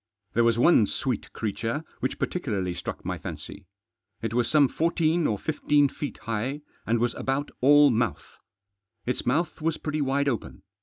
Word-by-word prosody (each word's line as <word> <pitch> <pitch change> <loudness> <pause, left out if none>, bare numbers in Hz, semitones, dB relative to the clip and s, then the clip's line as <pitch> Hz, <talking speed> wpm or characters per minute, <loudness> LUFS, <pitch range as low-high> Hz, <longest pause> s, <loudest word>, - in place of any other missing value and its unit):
There 120 - +3
was 115 -1 +3
one 120 -5 +5
sweet 125 +2 -3
creature 115 +6 -3 0.2
which - - -2
particu 180 -5 -3
larly 90 -3 -1
struck - - -6
my - - -3
fancy. - - -8 0.6
It 115 -1 -2
was 120 -1 +1
some 150 -3 +5
fourteen 165 +2 +1
or 105 - 0
fifteen 145 +1 +2
feet 145 +2 -6
high, 115 +6 -2 0.3
and 115 +2 +2
was 120 +1 +1
about 135 +2 -2
all 145 +1 +7
mouth. 115 - -2 0.7
Its 125 - -2
mouth 160 +6 0
was 160 0 0
pretty 155 -1 -2
wide 140 +1 +1
open. 120 -5 -3
135 Hz, 165 wpm, -26 LUFS, 115-150 Hz, 0.7 s, all